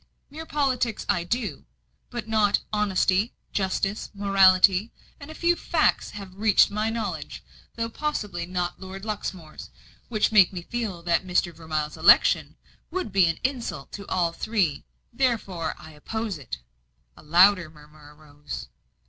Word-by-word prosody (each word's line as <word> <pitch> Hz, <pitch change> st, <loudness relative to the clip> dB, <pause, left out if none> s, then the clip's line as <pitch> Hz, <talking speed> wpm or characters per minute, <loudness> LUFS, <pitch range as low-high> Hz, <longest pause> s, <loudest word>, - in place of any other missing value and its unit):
"Mere 320 Hz, +2 st, -8 dB
politics 255 Hz, -6 st, 0 dB
I 175 Hz, -, +1 dB
do, 220 Hz, +4 st, -3 dB, 0.4 s
but -, -, -6 dB
not 215 Hz, -2 st, +2 dB
honesty, 205 Hz, 0 st, +1 dB, 0.2 s
justice, 195 Hz, +1 st, -1 dB
morality; 195 Hz, +1 st, +4 dB, 0.3 s
and 285 Hz, -, -10 dB
a 315 Hz, -, -9 dB
few 345 Hz, +1 st, +2 dB
facts 330 Hz, -2 st, +1 dB
have 195 Hz, -2 st, -9 dB
reached 210 Hz, +1 st, +4 dB
my 215 Hz, +2 st, -1 dB
knowledge, 225 Hz, 0 st, -4 dB, 0.3 s
though 230 Hz, 0 st, -2 dB
possibly 210 Hz, -, -3 dB
not 180 Hz, 0 st, -3 dB
Lord 190 Hz, +2 st, -8 dB
Luxmore's, 190 Hz, -7 st, -6 dB, 0.4 s
which 215 Hz, -2 st, +1 dB
make 200 Hz, -4 st, +6 dB
me 180 Hz, -3 st, -6 dB
feel 210 Hz, -6 st, -4 dB
that 170 Hz, +1 st, +1 dB
Mr. 180 Hz, -2 st, 0 dB
Vermilye's 155 Hz, -2 st, -4 dB
election -, -, +5 dB, 0.3 s
would 365 Hz, -, -3 dB
be 190 Hz, -2 st, +4 dB
an 165 Hz, -1 st, -1 dB
insult 245 Hz, -, -3 dB
to 200 Hz, -1 st, -8 dB
all 175 Hz, -2 st, +1 dB
three; 180 Hz, -7 st, -1 dB, 0.3 s
therefore, 225 Hz, -10 st, -1 dB
I 155 Hz, +1 st, -12 dB
oppose 205 Hz, +5 st, -5 dB
it." 130 Hz, -, -6 dB, 0.6 s
A -, -, -15 dB
louder 175 Hz, +2 st, +5 dB
murmur 150 Hz, -1 st, -17 dB
rose. 145 Hz, -, -9 dB
195 Hz, 140 wpm, -25 LUFS, 170-225 Hz, 0.6 s, make